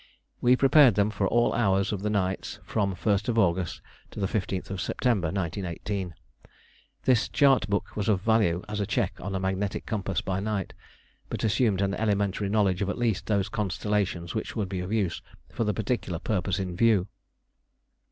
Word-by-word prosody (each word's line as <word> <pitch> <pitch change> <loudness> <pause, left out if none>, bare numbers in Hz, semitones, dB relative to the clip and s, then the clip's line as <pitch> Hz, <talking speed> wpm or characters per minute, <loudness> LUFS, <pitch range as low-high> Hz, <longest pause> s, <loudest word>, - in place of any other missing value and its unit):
We 125 +1 +5
prepared 135 -3 +6
them 105 +1 +2
for 100 -1 0
all 120 +4 +2
hours 100 -4 +2
of 100 -3 -3
the 105 - -1
nights 95 -2 -1
from 100 -3 0
the 95 - -4
1st 105 +4 0
August 90 -4 +1 0.3
to - - -9
the 100 - +1
15th 95 -1 -3
September 110 -8 0
1918. 95 +1 -3 0.9
This 125 -3 +3
chart 135 -5 +3
book 100 -2 -2
was 105 0 -1
of 100 -3 +3
value 100 -4 +2
as 105 0 -4
a 100 - -1
check - - 0
on 95 +2 -4
a - - 0
magnetic 95 +1 -2
compass 100 -6 -2
by 95 0 -2
night, 100 -2 -2 0.6
but - - -4
assumed 105 -3 +2
an 100 0 0
elementary 100 -2 0
knowledge 100 -3 +2
of 100 - 0
at - - -2
least 115 -5 0
those 100 -2 +1
constellations 100 -3 -1
which 110 - -4
would 105 -4 -2
be 95 -2 -3
of 90 +2 -4
use 100 -7 0 0.3
for 115 - -2
the 105 - +2
particular 105 -4 -2
purpose 95 +1 -1
in 90 -3 -3
view. 110 -2 +3
100 Hz, 180 wpm, -27 LUFS, 95-110 Hz, 0.9 s, prepared